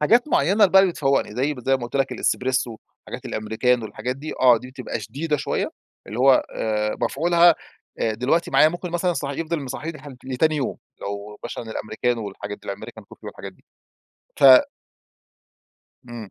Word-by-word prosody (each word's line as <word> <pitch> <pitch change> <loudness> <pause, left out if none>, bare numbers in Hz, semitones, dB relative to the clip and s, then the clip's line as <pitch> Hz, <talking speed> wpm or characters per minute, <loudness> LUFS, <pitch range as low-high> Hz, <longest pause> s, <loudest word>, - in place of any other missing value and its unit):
حاجات 235 - +3
معيّنة 165 - +2
اللي 195 - +5
بقى 190 - +8
اللي 190 -2 +2
بتفوّقني، 135 -8 0
زي 140 +4 0
زي 135 +2 +1
ما 130 - -11
قُلت 120 - -4
لك 135 -1 0
الاسبريسو، 125 -2 -1 0.3
حاجات - - -8
الأمريكانو 110 +2 0
الحاجات 125 +4 -4
دي 150 +3 -6
آه، 125 -2 +7
دي 125 +3 -11
بتبقى 130 -2 -5
شديدة 150 +2 -2
شويّة، 135 - -2 0.4
اللي 110 +4 -6
هو 135 0 +5
آآ، 105 -1 -1
مفعولها 170 +2 +4 0.4
آآ 110 - 0
دلوقتي 135 +9 0
معايا 155 - +6
ممكن 175 +1 -6
مثلًا 175 +1 0
صح 140 -4 -3
يفضل 160 +3 -3
مصحّيني 155 +4 -6
لح 145 - -11 0.2
لتاني 150 +4 +1
يوم. 135 - -2 0.2
لو 100 +1 -6
مثلًا 120 - -5
الأمريكانو 110 +1 -2
والحاجات 100 +1 -7
دي، - - -14
الأمريكان 100 - -9
كوفي - - -15
والحاجات - - -8
دي. - - -29 0.8
ف - - -1 1.7
إمم، 115 -4 -8
130 Hz, 175 wpm, -23 LUFS, 115-155 Hz, 1.7 s, بقى